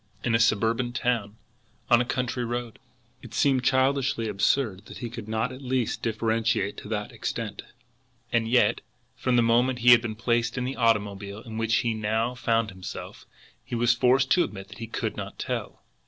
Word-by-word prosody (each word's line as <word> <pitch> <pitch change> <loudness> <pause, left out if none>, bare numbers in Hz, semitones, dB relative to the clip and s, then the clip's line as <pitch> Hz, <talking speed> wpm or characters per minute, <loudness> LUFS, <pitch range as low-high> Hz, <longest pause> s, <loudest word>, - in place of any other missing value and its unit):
In 120 - 0
a 115 - +4
suburban 115 +2 +2
town? 120 -4 -1 0.6
On 120 0 +7
a - - 0
country 125 0 -2
road? 120 -1 -4 0.4
It - - -10
seemed 135 -3 +3
childishly 130 -2 +2
absurd 105 0 0
that - - -10
he 120 -3 -6
could 115 -3 -7
not 110 +3 -1
at 130 +1 -9
least 130 -3 -1
differentiate 110 -2 0
to - - -8
that 105 -1 -3
extent; 110 -3 -4 0.7
and 115 -1 +2
yet, 120 +2 +3 0.3
from 130 -1 0
the 120 - +5
moment 120 +2 +3
he 120 0 +6
had 120 -1 +8
been 115 -3 -4
placed 120 +2 0
in 125 - -1
the 130 +2 -3
automobile 105 -3 0
in 110 -1 -6
which 115 +1 +1
he 115 - +1
now 110 +3 -1
found 115 -3 0
himself, 95 -1 -8 0.4
he - - -5
was 120 0 +3
forced 130 +3 +3
to 180 - +5
admit 95 -2 -7
that - - -12
he 115 - -5
could - - -3
not - - -7
tell. - - -4
115 Hz, 185 wpm, -26 LUFS, 110-125 Hz, 0.7 s, had